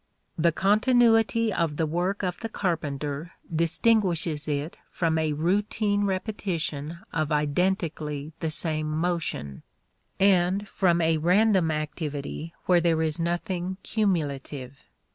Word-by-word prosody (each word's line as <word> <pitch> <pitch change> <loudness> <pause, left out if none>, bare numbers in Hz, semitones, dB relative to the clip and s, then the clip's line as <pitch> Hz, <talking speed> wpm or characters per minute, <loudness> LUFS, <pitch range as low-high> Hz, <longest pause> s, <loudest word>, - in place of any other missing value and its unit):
The 170 -1 +3
continuity 225 +3 +3
of 160 -3 -1
the 160 - +1
work 180 +6 -1
of 180 -1 -2
the 225 - -4
carpenter 155 -5 -3 0.2
distinguishes 170 -3 +1
it 145 +2 -2
from 160 -2 0
a 155 -1 0
routine 205 +5 +1
repetition 175 -6 -3 0.2
of 155 0 -1
identically 150 -1 -1
the 160 - -1
same 155 -1 0
motion, 155 - -2 0.6
and 195 +1 +3
from 175 -3 +2
a 160 0 +3
random 185 +1 +3
activity 155 0 -4
where 180 -2 +4
there 165 -1 +2
is 155 0 -1
nothing 175 +2 -2
cumulative. 145 - -2
170 Hz, 115 wpm, -26 LUFS, 155-190 Hz, 0.6 s, where